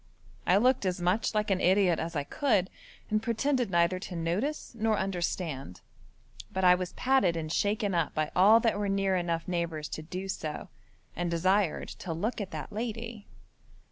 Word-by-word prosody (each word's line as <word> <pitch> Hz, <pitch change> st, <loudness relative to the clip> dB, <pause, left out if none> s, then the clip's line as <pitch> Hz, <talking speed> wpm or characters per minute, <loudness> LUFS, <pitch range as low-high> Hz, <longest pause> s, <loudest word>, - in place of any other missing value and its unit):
I 180 Hz, -, +5 dB
looked 250 Hz, +3 st, +3 dB
as 180 Hz, 0 st, -1 dB
much 180 Hz, +6 st, 0 dB
like 210 Hz, -1 st, +1 dB
an 185 Hz, -, +1 dB
idiot 185 Hz, -2 st, +3 dB
as 165 Hz, +1 st, -4 dB
I 145 Hz, -, 0 dB
could, 205 Hz, -, +1 dB, 0.4 s
and 215 Hz, 0 st, +2 dB
pretended 245 Hz, +1 st, 0 dB
neither 170 Hz, +1 st, +2 dB
to 185 Hz, -, -7 dB
notice 185 Hz, -, -2 dB
nor 220 Hz, -2 st, +1 dB
understand, 170 Hz, -, -3 dB, 0.7 s
but 190 Hz, -, -2 dB
I 180 Hz, 0 st, +8 dB
was 180 Hz, 0 st, -2 dB
patted 250 Hz, -10 st, +2 dB
and 155 Hz, -1 st, -4 dB
shaken 205 Hz, -1 st, 0 dB
up 170 Hz, -3 st, 0 dB
by 155 Hz, -1 st, -1 dB
all 205 Hz, +5 st, +7 dB
that 225 Hz, -3 st, +1 dB
were 205 Hz, -1 st, -1 dB
near 195 Hz, -1 st, +1 dB
enough 170 Hz, -2 st, -1 dB
neighbours 170 Hz, -4 st, -2 dB
to -, -, -5 dB
do 185 Hz, +5 st, -6 dB
so, 155 Hz, -5 st, -5 dB, 0.5 s
and 175 Hz, 0 st, -1 dB
desired 185 Hz, +2 st, +1 dB
to 170 Hz, -, -4 dB
look 210 Hz, +8 st, -2 dB
at 195 Hz, -, -4 dB
that -, -, -6 dB
lady. 230 Hz, -1 st, -5 dB
185 Hz, 175 wpm, -29 LUFS, 170-215 Hz, 0.7 s, I